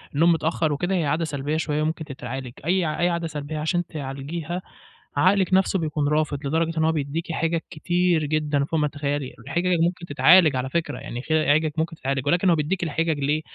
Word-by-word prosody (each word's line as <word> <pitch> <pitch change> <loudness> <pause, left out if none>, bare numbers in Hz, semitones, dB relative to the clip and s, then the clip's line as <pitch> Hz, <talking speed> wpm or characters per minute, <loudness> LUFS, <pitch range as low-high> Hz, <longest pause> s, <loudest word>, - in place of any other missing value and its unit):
النوم 170 +3 +5
متأخر 160 -1 +1
وكده 175 +6 -1
هي 165 -4 +1
عادة 160 +4 0
سلبية 145 +1 -2
شوية 150 -2 -1
وممكن 160 0 -2
تتعالج، 130 -2 -6
أي 180 +1 +2
ع 155 -1 -2
أي 175 - +3
عادة 170 -1 -1
سلبية 150 0 -5
عشان 175 +3 0
تعالجيها 155 +4 -5 0.6
عقلِك 190 0 +3
نفسه 190 0 +3
بيكون 150 -2 -1
رافض، 150 -1 0
لدرجة 165 +2 0
إن 160 - +2
هو 160 - +3
بيديكِ 160 +2 -3
حجج 165 +1 0
كتير 175 0 +1
جدًا 150 -1 0
فوق 160 +1 -1
ما 150 - +2
تتخيلي، 145 -2 -3
الحجج 170 +8 0
ممكن 175 +1 0
تتعالج 150 +2 +5
على 130 +1 -2
فكرة، 155 -5 -2
يعني 125 -3 -6
خ 155 - -8
أي 155 -2 +4
حجج 155 0 +1
ممكن 165 +1 -1
تتعالج 135 -2 -2
ولكن 180 +4 +3
هو 170 - +5
بيديكِ 170 +4 -1
الحجج 160 -1 0
ليه، 150 +3 0
155 Hz, 205 wpm, -24 LUFS, 145-170 Hz, 0.6 s, النوم